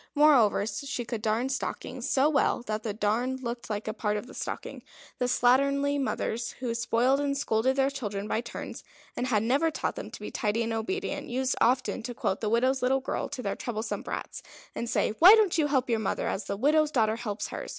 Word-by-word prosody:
Moreover, 275 -9 +5
she 240 +3 -4
could 230 -2 -4
darn 225 +4 0
stockings 270 - -4
so 270 +2 +4
well 280 -5 +1
that 215 -2 -3
the 220 - -3
darn 220 +5 0
looked 235 -2 -6
like 210 0 -3
a 215 - -1
part 210 -1 -1
of 210 - -5
the 255 - -12
stocking. - - -5 0.4
The 250 - +1
slatternly 275 +3 +2
mothers, 235 -3 -2
who 245 -2 -3
spoiled 235 +3 +2
and 280 -1 0
scolded 255 0 +1
their 270 0 +2
children 210 -7 -4
by 220 - 0
turns, 235 - -7 0.3
and 250 - -2
had 215 -4 +2
never 275 +8 +2
taught 315 - -3
them - - -6
to - - -10
be - - -6
tidy 215 +2 0
and 230 0 -2
obedient, 300 - -3
used 260 +1 0
often 250 0 +2
to 240 +1 -6
quote 190 - -1
the 215 - 0
widow's 255 +4 +2
little 260 +2 +2
girl 265 - -3
to 250 - -6
their 200 - -2
troublesome 225 -2 -4
brats, - - -6 0.3
and 235 - -4
say, 240 - +1
"Why 370 +6 +10
don't 410 -7 +2
you 300 - +3
help 265 -3 +1
your 230 -2 +1
mother 215 - -1
as 195 - -2
the 200 0 -3
widow's 300 +6 +3
daughter 225 -6 +1
helps 215 -3 -4
her?" - - -6
245 Hz, 215 wpm, -28 LUFS, 220-270 Hz, 0.4 s, Why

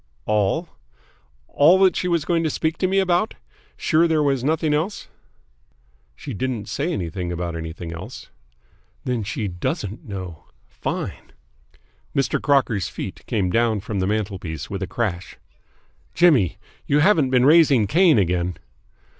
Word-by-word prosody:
"All 105 - +1 0.9
that 180 +4 +6
she 180 - -1
was 170 -4 0
going 170 -1 +1
to 160 - +1
speak 160 +2 -2
to 185 - +2
me 190 +1 0
about? 190 +3 +1 0.4
Sure 165 +1 +3
there 155 -2 +2
was 135 -3 +1
nothing 155 +1 +1
else?" 165 +8 -2 1.1
"She 135 - -7
didn't 120 0 -3
say 145 +10 -2
anything 90 - -3
about 85 -1 -3
anything 80 +1 -6
else." 85 - -9 0.7
"Then 125 -3 -1
she 105 +1 -3
doesn't 95 +3 -4
know! 95 -7 -7 0.2
Fine!" - - -5 0.8
Mr. 135 -4 +1
Crocker's 130 - +2
feet - - -7
came 95 -4 0
down 115 -1 +2
from 100 +1 -4
the 95 - 0
mantelpiece 95 -7 -3
with 100 0 -4
a 95 - -2
crash. 95 -7 -3 0.8
"Jimmy! 145 - +4 0.3
You 145 - +3
haven't 155 -6 +4
been 125 -1 +3
raising 145 -7 +5
Cain 165 - +4
again?" 90 -2 0
120 Hz, 140 wpm, -22 LUFS, -, 1.1 s, that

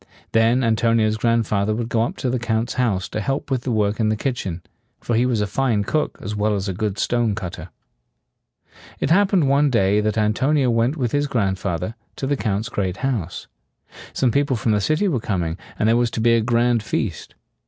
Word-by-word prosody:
Then 115 +3 +3
Antonio's 115 -1 +2
grandfather 110 -2 +1
would 115 0 -3
go 115 -1 0
up 115 - -2
to 125 - -1
the 130 - -1
Count's 115 -1 -1
house 105 -7 0
to 110 - -3
help 135 +4 -3
with 130 -2 +1
the 125 - -3
work 105 -1 0
in 110 -1 +2
the 110 - +1
kitchen; 105 -8 -3 0.4
for 120 - -2
he 120 +3 +3
was 115 -4 0
a - - +1
fine 110 -1 0
cook 150 +8 -1
as 105 +1 -4
well 105 0 +1
as 100 0 -3
a 95 - -2
good 105 +1 -2
stone 120 -1 +1
cut 95 -5 -5
ter. - - -9 1.3
It - - -1
happened 190 -4 +4
one 140 +2 +3
day 105 -4 +2
that 110 0 -1
Antonio 125 +5 +2
went 120 +6 +1
with 125 -5 -1
his 145 0 +1
grandfather 95 -4 -1 0.2
to - - -4
the 140 +1 +1
Count's 110 -3 -2
great 95 -4 -2
house. 105 -10 -3 0.7
Some 130 -3 +1
people 140 +1 +1
from 110 0 0
the 105 -1 +2
city 155 - +1
were 145 -10 0
coming, 90 -7 -2 0.2
and 110 - +1
there 115 - +4
was 120 0 +2
to - - 0
be 115 +1 +4
a 115 - +3
grand 120 0 +2
feast. 105 -5 -3
115 Hz, 210 wpm, -21 LUFS, 105-125 Hz, 1.3 s, happened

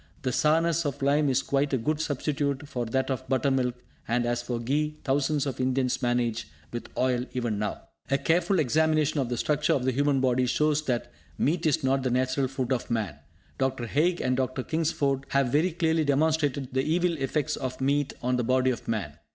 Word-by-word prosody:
The 130 - 0
sourness 165 +4 +2
of 140 -2 -3
lime 145 +1 +3
is 130 - +1
quite 140 +1 0
a - - +3
good 150 +6 -1
substitute 145 -1 -2
for 125 -5 -3
that 130 +4 0
of 130 0 -4
buttermilk; 130 -2 +1 0.3
and 120 +1 +1
as 120 0 0
for 120 0 -3
ghee, 150 +5 -1
thousands 145 +1 +1
of 130 -2 -3
Indians 130 0 0
manage 120 -2 0 0.3
with 120 - -5
oil 125 -1 +1
even 120 -5 -1
now. 105 - -3 0.3
A 140 - +3
careful 170 +6 +2
examination 155 +1 +2
of 130 -3 -1
the 120 - -2
structure 150 +4 +1
of 125 - 0
the 130 - +2
human 140 +1 +2
body 130 -1 +2
shows 150 +3 +1
that 120 -4 -2 0.3
meat 165 +2 +1
is 145 - +1
not 135 +1 +2
the 130 - 0
natural 130 +2 +1
food 130 -1 -2
of 125 - -3
man. 105 -11 -2 0.4
Dr. 130 -2 0
Haig 165 +9 +1
and 130 0 +1
Dr. 130 0 -1
Kingsford 140 -4 0
have 140 -2 +2
very 160 +6 +2
clearly 160 -1 +1
demonstrated 145 -2 +1
the 130 - +2
evil 170 +4 +1
effects 135 +1 -1
of 130 -1 -5
meat 140 +1 +1
on 125 0 +1
the 125 - 0
body 130 +2 +2
of 120 - -6
man. 90 -10 -3
135 Hz, 200 wpm, -27 LUFS, 125-150 Hz, 0.4 s, lime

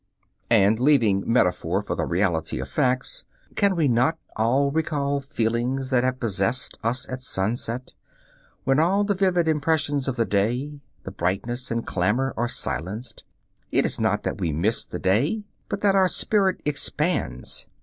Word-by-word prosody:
And 110 -1 +4
leaving 115 -8 +3
metaphor 90 -3 +1
for - - -3
the - - -2
reality 85 -6 0
of 65 - -4
facts, 125 - 0 0.3
can 200 -2 +3
we 160 -4 +2
not 125 +6 +2 0.2
all 130 +6 +2
recall 145 -2 0
feelings 130 -1 -2
that 125 -1 +3
have 130 0 -1
possessed 115 +2 -1
us 120 +3 0
at 130 0 -6
sunset, 120 +2 -2 0.7
when 135 +2 +2
all 190 +6 +3
the 205 0 +1
vivid 185 -3 +1
impressions 150 -2 +1
of 135 - -1
the 115 - +1
day, 125 +9 -1 0.2
the - - -7
brightness 115 +8 -2
and 115 0 -2
clamor, 105 +9 0
are 120 +1 -1
silenced? 110 +2 -3 0.5
It - - +2
is - - -1
not 105 -2 +1
that - - -3
we 85 -4 -1
miss 95 +10 +1
the - - -6
day, 135 - +1 0.3
but 200 -1 -3
that 200 -1 +4
our 190 -1 +4
spirit 195 0 +2
expands. 150 - -1
125 Hz, 160 wpm, -24 LUFS, 105-145 Hz, 0.7 s, And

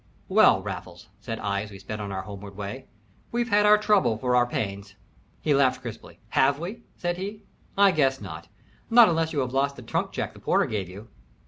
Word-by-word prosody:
"Well, - - +5
Raffles," - - -8
said 115 - -5
I, 100 0 -1
as 105 - -7
we 100 - -10
sped 105 +2 -7
on 100 -1 -5
our 95 0 -4
homeward 100 -1 -9
way, 105 +6 -6 0.4
"we've 240 0 -1
had 210 0 +4
our 210 0 +7
trouble 205 - +2
for 125 +1 0
our 120 0 +4
pains." 100 -3 -4 0.5
He 150 - +3
laughed 130 -2 +2
crisply. - - -9
"Have 140 +1 +3
we?" 190 +9 -6 0.2
said 175 0 -2
he. 205 +3 -6 0.3
"I 200 -1 +6
guess 135 -5 +2
not 85 -4 -8 0.4
not 235 -2 +8
unless 165 -1 0
you 145 - 0
have 125 -1 -3
lost 140 +1 +1
the 125 - -11
trunk 115 - -2
check - - -4
the - - -14
porter - - +2
gave 100 -4 -3
you." 100 +5 -11
130 Hz, 210 wpm, -26 LUFS, -, 0.5 s, not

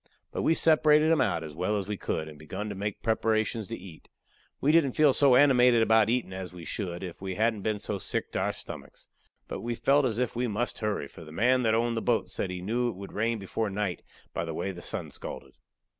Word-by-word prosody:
But - - -3
we 165 - +3
separated 155 -1 +5
'em 160 - +4
out 95 -9 +1
as 75 -2 -8
well 95 +5 0
as 100 -2 -3
we 105 - -2
could, 80 -4 -3
and 75 -1 -11
begun 95 +7 -5
to - - -4
make 100 +1 -4
preparations 110 -1 0
to 115 - -5
eat. 90 -3 -13 0.5
We 145 - +3
didn't 155 -5 +4
feel 150 -3 +5
so 135 -2 +5
animated 125 -4 +6
about 110 -1 +4
eatin' 120 -5 0
as 95 -1 -6
we 90 -2 -10
should 90 -4 -4
if 90 -1 -7
we 95 -1 -4
hadn't 110 0 +1
been 110 +1 0
so 100 -1 -4
sick - - -3
to - - -1
our - - +1
stomachs. - - -10 0.4
But - - -5
we 120 0 -2
felt 140 +4 +3
as 115 -3 -3
if 125 -1 -1
we 125 +1 0
must 115 +3 -2
hurry, 105 -9 -2
for 80 - -12
the 75 - -11
man 125 +9 +3
that 110 -2 +2
owned 115 +1 +1
the 115 - -1
boat 120 -1 0
said 95 - -2
he 90 -1 -5
knew 120 +5 0
it 115 - -6
would 100 +1 -9
rain 115 +2 0
before 105 +2 -2
night 100 -2 -2 0.3
by 85 - -2
the 80 -1 -5
way 95 - -2
the 90 -2 -9
sun - - -5
scalded. 65 -1 -8
110 Hz, 245 wpm, -28 LUFS, 95-120 Hz, 0.5 s, animated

